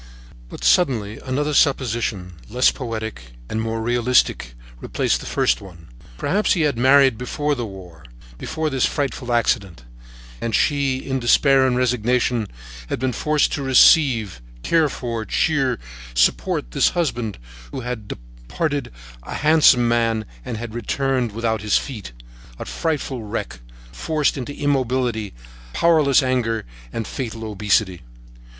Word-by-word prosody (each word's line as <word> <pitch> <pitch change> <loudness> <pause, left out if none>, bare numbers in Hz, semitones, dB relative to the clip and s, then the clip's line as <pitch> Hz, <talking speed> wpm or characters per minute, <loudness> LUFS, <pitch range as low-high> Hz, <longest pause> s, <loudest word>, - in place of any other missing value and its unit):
But, - - -10
suddenly, 115 - +2
another 145 +3 -1
supposition, 120 - +1 0.2
less 125 +4 +3
poetic 110 - -6
and 110 - -2
more 115 0 -2
realistic, 120 - +1 0.2
replaced - - -1
the - - -8
first - - +1
one. 85 -5 -13 0.3
Perhaps 205 - +1
he 175 - 0
had 150 -4 +1
married 130 0 +4
before 145 +4 -1
the 120 -4 -3
war, 90 -6 -12 0.3
before 155 -1 -3
this 135 -2 +2
frightful 135 -3 -3
accident, 100 - 0 0.6
and 115 - -1
she, 140 -3 +1
in 130 0 -3
despair 130 +2 +4
and 125 -1 +1
resignation, 125 -2 +1 0.4
had - - -2
been 130 +1 -1
forced 150 +2 +1
to - - -2
receive, 130 - +4 0.2
care 160 -3 +3
for, 115 -4 -4
cheer, 135 0 +1
and - - -8 0.4
support - - +1
this - - +3
husband, 120 - -1 0.3
who - - -5
had 120 -4 -5
departed, - - -4 0.3
a - - -7
handsome 150 -6 +5
man, 115 -2 +1 0.2
and 110 - -5
had 115 0 -6
returned 125 +1 -1
without 110 0 -1
his 105 0 +2
feet, 110 - -6 0.5
a - - -6
frightful 135 - -3
wreck, 105 - -5 0.3
forced 150 - 0
into 140 +1 -6
immobility, 125 - -1 0.4
powerless 155 -5 +4
anger, 120 -3 0 0.3
and 115 - -4
fatal 115 -4 -5
obesity. 105 -4 0
120 Hz, 135 wpm, -21 LUFS, 110-135 Hz, 0.6 s, handsome